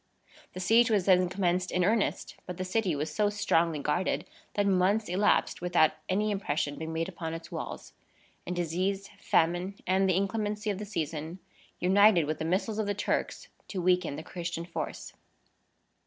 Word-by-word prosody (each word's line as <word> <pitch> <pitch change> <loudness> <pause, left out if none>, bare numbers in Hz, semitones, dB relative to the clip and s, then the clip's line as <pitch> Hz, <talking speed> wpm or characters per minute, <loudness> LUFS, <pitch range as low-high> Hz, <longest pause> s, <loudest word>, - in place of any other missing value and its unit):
The - - -6
siege 225 +6 +4
was 205 -5 +2
then 180 -2 +4
commenced 185 -1 0
in 180 - +1
earnest; 215 +1 0
but 180 -1 -6
the 185 - -3
city 185 -3 0
was 150 +2 -3
so 210 -1 +2
strongly 170 -6 +1
guarded, 150 +6 -1 0.3
that 205 - +2
months 195 +3 +2
elapsed 190 +1 +1
without 175 -3 +4 0.2
any 210 +3 +1
impression 145 -7 -2
being 160 0 -4
made 165 +1 -1
upon 165 -3 -5
its 165 - -9
walls; - - -6 0.5
and 180 - -2
disease, 185 +4 -1
famine, 175 +4 +1
and 190 +1 +2
the 185 - +3
inclemency 210 +2 -1
of 200 - -4
the 210 - -5
season, 160 -3 -4 0.4
united 195 -1 +5
with 155 +1 -3
the 160 - -2
missiles 200 +6 0
of 215 - 0
the 205 - 0
Turks 210 - -2 0.2
to 195 - -4
weaken 180 -4 +2
the 155 - -7
Christian 170 -1 -5
force. 170 - -5
185 Hz, 170 wpm, -29 LUFS, 170-200 Hz, 0.5 s, united